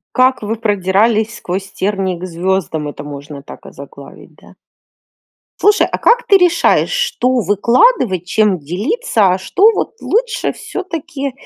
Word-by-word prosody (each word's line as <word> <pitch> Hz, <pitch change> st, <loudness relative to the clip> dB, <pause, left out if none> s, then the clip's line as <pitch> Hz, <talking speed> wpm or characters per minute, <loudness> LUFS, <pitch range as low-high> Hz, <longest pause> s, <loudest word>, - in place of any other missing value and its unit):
Как 255 Hz, -1 st, +2 dB
вы 215 Hz, +2 st, -3 dB
продирались 215 Hz, +2 st, +1 dB
сквозь 190 Hz, 0 st, -5 dB
тернии 190 Hz, -2 st, -2 dB
к 180 Hz, -, -8 dB
звездам- 170 Hz, -3 st, -2 dB
это 145 Hz, 0 st, -8 dB
можно 145 Hz, 0 st, -9 dB
так -, -, -13 dB
озаглавить, 140 Hz, +1 st, -13 dB
да? -, -, -19 dB, 1.1 s
Слушай, 415 Hz, 0 st, +3 dB
а -, -, -2 dB
как 475 Hz, 0 st, +3 dB
ты 400 Hz, -, +7 dB
решаешь, 355 Hz, -2 st, +2 dB
что 260 Hz, -, 0 dB
выкладывать, 210 Hz, -, +2 dB
чем 205 Hz, -1 st, +1 dB
делиться, 210 Hz, -, 0 dB
а 185 Hz, -, -1 dB
что 385 Hz, -, +3 dB
вот -, -, -3 dB
лучше 465 Hz, +2 st, -1 dB
всё-таки 330 Hz, -7 st, -6 dB
210 Hz, 135 wpm, -15 LUFS, -, 1.1 s, ты